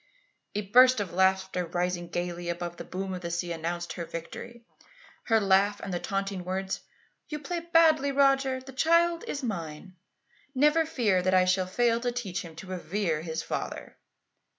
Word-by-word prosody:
"A 210 - 0
burst 250 +5 +6
of 200 -5 -3
laughter, 190 0 +2
rising 175 0 -2
gaily 175 0 -3
above 175 0 -4
the - - -6
boom 190 +1 -4
of 180 - -5
the 170 - -4
sea, 170 +1 -2
announced 170 +1 -3
her 175 - -5
victory 230 +9 -8 0.6
her 225 -1 +4
laugh 200 0 +3
and 190 - -5
the 175 - -1
taunting 195 -1 -3
words: 190 +1 -3 0.5
'You 300 - -3
play 320 +4 -4
badly, 325 -4 +4
Roger. 270 -1 +3
The 265 +1 -12
child 335 +4 +3
is 285 - -4
mine. 175 -5 -5 0.6
Never 300 +4 +4
fear 210 -11 +2
that 185 +1 +2
I 185 0 +5
shall 185 0 +2
fail 230 +4 +2
to 245 0 -1
teach 230 -7 -3
him 165 -2 -10
to 180 - -9
revere 185 -2 -2
his 160 -1 -4
father. - - -5
190 Hz, 175 wpm, -28 LUFS, 175-255 Hz, 0.6 s, burst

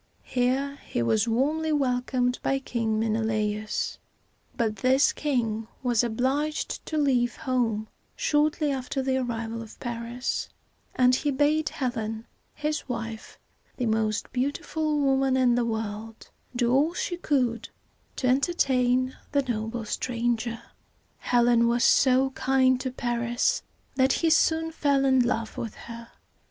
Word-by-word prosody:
Here 265 +3 0
he 120 - -1
was 215 - +2
warmly 300 +7 +1
welcomed 250 -3 0
by 270 - +1
King 230 -5 -1
Men 220 -1 +1
e - - 0
la´us; 215 -1 -1 0.6
but 220 -3 0
this 260 +2 +3
king 225 -7 -1 0.2
was 245 -2 +2
obliged 265 +6 -1
to 315 - -2
leave 250 -5 +2
home 230 -5 -1 0.3
shortly 300 0 +1
after 265 0 -2
the 260 0 +1
arrival 230 -2 -3
of 225 -1 -11
Paris, 240 +1 -3 0.5
and 250 0 +4
he 290 +3 +1
bade 295 +3 +2
Helen, 225 -3 -3 0.3
his 300 -2 -3
wife, 225 -2 -5 0.4
the 250 - -1
most 220 -1 0
beautiful 300 +3 -1
woman 270 -2 +2
in 250 -2 +4
the 240 0 +1
world, 220 0 -5 0.2
do 240 0 +2
all 300 +6 +3
she 355 - -2
could 255 -9 0 0.5
to - - -3
entertain 255 -3 +2 0.2
the 280 -1 +3
noble 225 -2 -3
stranger. 235 0 -2 0.6
Helen 240 -1 +3
was 240 +1 +2
so 265 0 +4
kind 260 -1 +2
to 260 - -2
Paris 240 - 0 0.4
that 260 0 +4
he 330 -1 +1
soon 325 0 +3
fell 280 -3 +1
in 265 -1 +4
love 235 -2 0
with 225 - -5
her. 230 0 -9
250 Hz, 135 wpm, -26 LUFS, 230-275 Hz, 0.6 s, and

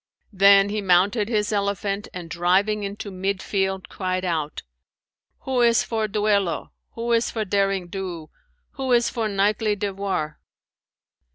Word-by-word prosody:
Then 195 +1 +6
he 210 +1 -2
mounted 200 +4 +3
his 210 -2 0
elephant 200 0 -1
and 180 -2 -7
driving 185 +5 +1
into 200 0 -5
mid 190 +1 -2
field, 190 -1 -2
cried 185 -1 -3
out, 160 -4 -2 0.8
'Who 260 -2 0
is 235 -1 +4
for 220 -2 -1
duello, 200 -5 0 0.2
who 235 +1 -3
is 230 0 +2
for 220 -2 -3
derring 195 -1 0
do, 175 -4 -6 0.4
who 265 -2 -3
is 240 -1 +3
for 230 -3 -1
knightly 205 +1 +1
devoir?' 195 -6 -3
200 Hz, 140 wpm, -23 LUFS, 185-215 Hz, 0.8 s, Then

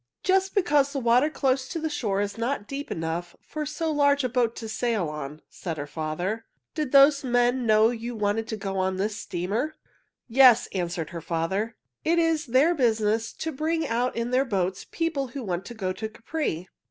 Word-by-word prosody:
"Just 385 +2 +2
because 295 -8 +3
the 275 - -1
water 250 +4 +4
close 265 -3 0
to 330 - -4
the 320 - -1
shore 215 -10 -1
is 205 0 -2
not 235 -1 -2
deep 280 +3 -5
enough 165 +2 -3
for 305 -1 -5
so 320 +1 -2
large 285 -1 +3
a 255 - 0
boat 235 -1 +1
to 225 - -6
sail 220 -4 -1
on," 150 0 -7
said 165 -4 -6
her 145 - -4
father. 165 +9 -3 0.3
"Did 305 -5 -2
those 280 +1 +6
men 245 0 +2
know 215 +1 +5
you 235 0 -5
wanted 215 +1 0
to 220 - -4
go 195 -1 -3
on 185 0 0
this 210 +2 -1
steamer?" 210 - -2 0.5
"Yes," 250 -1 +7
answered 170 -3 -3
her 170 - -6
father. 170 +7 -2 0.3
"It 335 +2 +2
is 330 -2 +2
their 265 +8 +4
business 225 -5 +1
to 320 - -4
bring 320 +3 -1
out 240 +2 0
in 235 +1 -2
their 255 +1 +3
boats 190 -6 -2
people 325 -5 -1
who 255 +2 -6
want 185 -2 -3
to 240 - -8
go 185 -4 -2
to 220 +3 -5
Capri." 220 - -3
235 Hz, 195 wpm, -26 LUFS, 195-280 Hz, 0.5 s, Yes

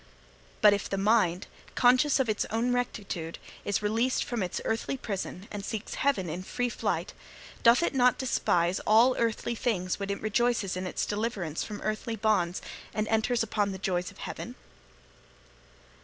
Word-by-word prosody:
But 210 - +8
if 200 - -2
the 195 - -1
mind, 195 -3 +2 0.3
conscious 255 +3 +4
of 265 - +2
its 215 -2 0
own 235 +3 +1
rectitude, 195 -9 -3 0.3
is 205 +1 -1
released 225 +5 +1
from 240 -3 -3
its 180 -2 -2
earthly 225 +4 -1
prison, 200 -4 -5
and 205 -1 -5
seeks 220 0 -4
heaven 235 -10 +1
in 170 +3 -4
free 245 +6 -2
flight, - - -2 0.5
doth 235 +7 +6
it - - 0
not 250 -2 +4
despise 180 -8 +1
all 230 +4 +6
earthly 230 0 0
things 205 -7 -1
when 200 0 -3
it 200 - -2
rejoices 220 -2 +1
in 185 0 -3
its - - -2
deliverance 205 -7 -2
from 210 -1 -7
earthly 215 +2 -2
bonds, 195 -5 +1 0.3
and 215 0 0
enters 225 +1 +2
upon 205 -2 0
the - - -5
joys 180 -2 -1
of - - -16
heaven?' - - -6
215 Hz, 165 wpm, -29 LUFS, 195-240 Hz, 0.5 s, But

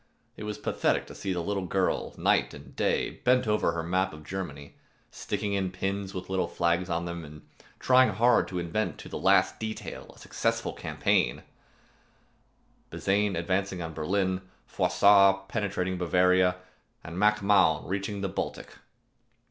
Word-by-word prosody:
It 105 - -7
was 105 0 -4
pathetic - - 0
to - - -11
see 95 - -4
the 90 -2 -2
little 100 0 -2
girl, 95 0 -1
night - - +1
and - - -13
day, - - -1
bent 125 -1 +3
over 105 -5 +1
her 85 -1 -3
map 95 +2 0
of 75 0 -11
Germany, 75 -5 -6 0.4
sticking 100 0 -3
in 95 -2 0
pins 95 +1 -3
with 95 -2 -6
little 95 -2 0
flags 85 +1 0
on 85 0 -1
them, 85 -1 -5
and 75 0 -13 0.3
trying 130 0 +5
hard 120 +2 +3
to 90 - -5
invent 90 +5 -2
to - - -10
the - - -5
last - - +3
detail 110 0 -6
a - - -20
successful - - -2
campaign: - - 0 1.5
Bazaine 100 0 0
advancing 95 +2 -1
on 80 -1 -5
Berlin, 95 +4 -1 0.2
Frossard 100 -1 +4
penetrating 95 -3 -2
Bavaria, 90 +1 +3 0.5
and 85 +3 -7
Mac 105 0 +3
Mahon 95 -6 +3
reaching 100 +2 -3
the 100 - -1
Baltic. 95 - -5
95 Hz, 155 wpm, -28 LUFS, 85-100 Hz, 1.5 s, trying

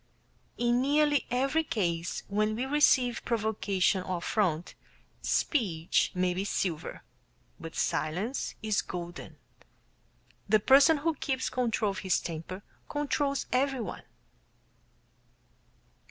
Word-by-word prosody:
In 240 +1 +2
nearly 290 +1 +2
every 270 +6 +1
case 170 - -2
where 210 +2 +1
we 235 +4 -2
receive 265 -4 +3
provocation 205 -4 +1
or 185 0 -3
affront, 170 -2 -1 0.5
speech 180 - +1
may 180 0 +1
be 185 +2 -2
silver, 180 -5 -3 0.6
but 165 - -8
"silence 175 - -1
is 215 -1 +1
golden." 175 0 -7 1.1
The 215 +1 +5
person 275 +8 +6
who 325 +3 0
keeps 265 -2 -2
control 230 -4 0
of 195 - -6
his 190 -2 +1
temper 170 +4 -6 0.3
controls 290 -1 -1
everyone. 260 -2 -1
220 Hz, 105 wpm, -29 LUFS, 180-270 Hz, 1.1 s, person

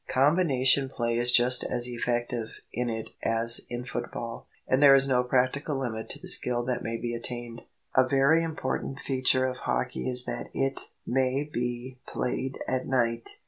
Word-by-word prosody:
Combination 135 -2 +3
play 115 -2 -2
is 120 +1 +7
just 125 +1 +5
as 120 -1 0
effective 120 -1 -3
in 125 0 -2
it 110 -1 -5
as 115 +1 +3
in 120 0 -5
football, 115 -1 -6 0.2
and 130 +2 +2
there 140 -1 +8
is 135 0 +4
no 125 -2 +2
practical 130 +3 0
limit 110 -4 -4
to - - -2
the - - -9
skill 120 -1 +3
that 125 -1 -2
may 115 0 -3
be 120 0 -4
attained. 120 0 -5 0.3
A 130 0 +4
very 140 +5 +3
important 140 -4 -4
feature 130 -1 +1
of 130 -1 -3
hockey 125 0 -2
is 125 0 +2
that - - -4
it 135 0 -2 0.2
may 130 +2 0
be 125 -2 -5
played 130 +1 -3
at 130 0 -1
night. 115 -3 -1
125 Hz, 170 wpm, -27 LUFS, 120-135 Hz, 0.3 s, there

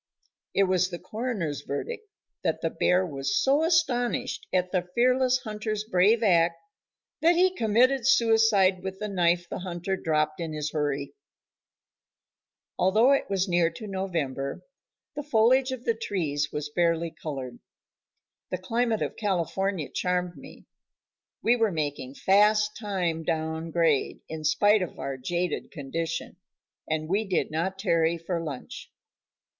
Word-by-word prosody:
It 195 - +5
was 185 -1 +2
the 175 - -5
coroner's 210 - -3
verdict 435 - -5 0.4
that - - -1
the - - -1
bear 180 +1 +2
was 135 -4 -2
so 280 +3 +3
astonished 290 -8 0
at 180 -1 0
the 180 -2 -1
fearless 255 +1 +3
hunter's 215 -1 -3
brave 215 +3 +3
act 170 -4 +4 0.7
that 335 +2 +5
he 365 +1 +4
committed 240 - +3
suicide 225 -7 +4
with 190 0 -5
the 210 - -4
knife 175 -3 +1
the - - -5
hunter 180 +1 -3
dropped 155 -3 0
in 165 -2 -4
his 150 -1 -3
hurry. 145 -2 -2 1.7
Although 215 +8 +4
it 275 - +1
was 195 0 0
near 175 -2 +3
to 220 - -9
November, 165 -9 -3 0.5
the 295 - -3
foliage 260 0 +3
of 255 -2 -6
the 230 - +2
trees 155 -10 -2
was 150 0 -4
barely 170 0 +1
colored. 135 -7 -6 0.9
The 185 - -2
climate 225 +4 0
of - - -4
California 195 -3 -1
charmed 180 -1 -1
me. - - -13 0.8
We 235 - +4
were 225 -3 +2
making 145 -4 -3
fast 210 +3 +3
time 185 -7 -2
down 160 0 -2
grade, 165 -4 +1
in 155 -1 -6
spite 205 +6 +4
of 180 - -5
our 135 - -4
jaded 170 +6 -2
condition, 165 +3 -4 0.5
and 155 0 -1
we 200 +6 +1
did 190 -6 -1
not 180 +5 -2
tarry 170 -4 +1
for 165 +1 -3
lunch. 145 -5 -7
185 Hz, 140 wpm, -27 LUFS, 160-220 Hz, 1.7 s, It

